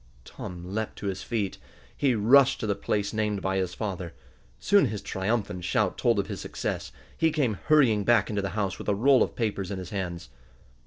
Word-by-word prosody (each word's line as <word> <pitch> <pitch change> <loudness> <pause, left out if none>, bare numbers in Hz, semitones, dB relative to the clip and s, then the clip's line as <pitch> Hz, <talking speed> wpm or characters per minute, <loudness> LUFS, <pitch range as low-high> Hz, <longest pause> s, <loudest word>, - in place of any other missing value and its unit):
Tom 90 -1 -8
leaped 110 0 -3
to - - -8
his 95 -1 -2
feet. 105 -5 -3 0.4
He 135 -4 +2
rushed 125 +6 +5
to - - -3
the 105 - +1
place 105 +1 -2
named 105 -2 0
by 95 0 0
his 90 -1 -2
father. 95 -6 -4 0.4
Soon 200 -7 +4
his 105 -2 -5
triumphant 95 -2 -2
shout 95 +2 +1
told 120 -3 +2
of 100 - +1
his - - -6
success. - - -4 0.2
He 160 0 +2
came 130 -10 0
hurrying 130 -9 +4
back 115 -2 +4
into 105 -2 -1
the 100 - -2
house 100 -2 -1
with - - -4
a 100 - +2
roll 130 +5 +4
of - - 0
papers 100 -5 -2
in 100 - -4
his 90 -1 -7
hands. 90 -4 -4
105 Hz, 205 wpm, -27 LUFS, 95-115 Hz, 0.4 s, rushed